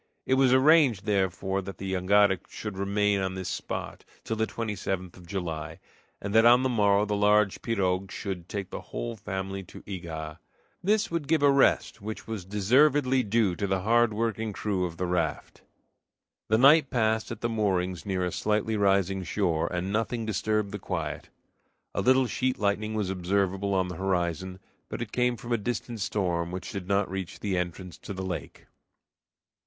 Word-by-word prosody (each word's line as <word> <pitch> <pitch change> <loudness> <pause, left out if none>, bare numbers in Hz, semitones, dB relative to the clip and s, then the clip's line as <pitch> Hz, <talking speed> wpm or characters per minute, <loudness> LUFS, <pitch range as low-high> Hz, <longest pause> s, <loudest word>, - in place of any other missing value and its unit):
It - - +1
was 130 -1 +4
arranged, 130 -6 +5
therefore, 95 -1 0
that 95 -2 -8
the 95 0 -4
jangada 95 +1 +4
should 105 -2 -6
remain 100 +1 +1
on 95 0 -2
this 95 -1 -4
spot - - -5 0.2
till 110 - -2
the 110 0 0
27th 95 -5 -4
of 90 -2 -14
July, 85 -4 -4 0.4
and 100 0 -5
that 110 0 +6
on 120 +2 +6
the 130 - +2
morrow 105 -3 +3
the 105 0 -1
large 105 -1 +3
pirogue 95 -4 0
should 95 -4 -5
take 95 -2 -4
the - - -5
whole 120 -1 -5
family 95 -1 -4
to - - -12
Ega. 80 -5 -6 0.4
This 210 +2 +2
would 165 -4 -2
give 155 -1 +2
a 140 - +6
rest, 135 -5 +2
which 110 +1 -6
was 110 -5 -5
deservedly 130 +7 +3
due 105 -4 +1
to 100 - -2
the 95 -1 0
hard 115 +3 +3
working 110 0 -2
crew 95 -2 -1
of 85 -2 -6
the 90 - -1
raft. 85 -4 -2 0.9
The 110 - +3
night 140 +3 +6
passed 110 -2 +1
at 115 -2 -7
the 120 - +1
moorings 95 -5 0
near 95 -3 -1
a 90 - -2
slightly 110 +3 0
rising 95 -2 +2
shore, 85 -4 0
and 90 +2 -2
nothing 115 +1 -1
disturbed 105 -1 -1
the 105 - -5
quiet. 80 -6 -4 0.6
A - - 0
little 130 +1 +4
sheet 130 +1 -1
lightning 105 +1 0
was 105 -3 -1
observable 95 +1 0
on 95 -1 +1
the 90 -2 -6
horizon, 95 -1 -1 0.3
but - - -3
it 110 - -10
came 125 -1 +1
from 120 +2 -8
a 120 - +2
distant 120 +1 -4
storm 90 -4 -1
which 90 +1 -6
did 100 -3 -6
not 100 0 +2
reach 95 -1 -5
the 100 -3 -1
entrance 90 0 -4
to - - -7
the 95 0 -4
lake. 90 -2 -6
100 Hz, 180 wpm, -27 LUFS, 95-110 Hz, 0.9 s, that